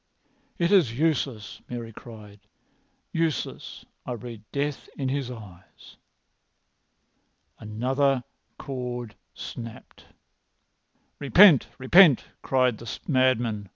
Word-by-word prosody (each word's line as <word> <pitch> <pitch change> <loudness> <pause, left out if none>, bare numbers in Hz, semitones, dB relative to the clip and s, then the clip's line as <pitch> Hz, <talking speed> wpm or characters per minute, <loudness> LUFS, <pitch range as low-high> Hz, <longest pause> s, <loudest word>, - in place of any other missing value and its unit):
"It 170 +1 +1
is 150 - +3
useless!" 135 -9 -1
Mary 115 -2 -6
cried. 105 -3 -12 0.7
"Useless! 165 -2 -3 0.2
I 125 - -5
read 115 -1 -8
death 145 0 -3
in 135 -2 -2
his 135 -2 -2
eyes." 105 -7 -13 1.6
Another 130 +5 0 0.3
cord 125 -4 -5
had - - -28 0.2
snapped. 115 -2 -9 1.1
"Repent! 150 - +6
Repent!" 145 +2 +6 0.2
cried 130 -4 +1
the 115 - -8 0.2
madman. 120 - +1
125 Hz, 90 wpm, -26 LUFS, 115-140 Hz, 1.6 s, Repent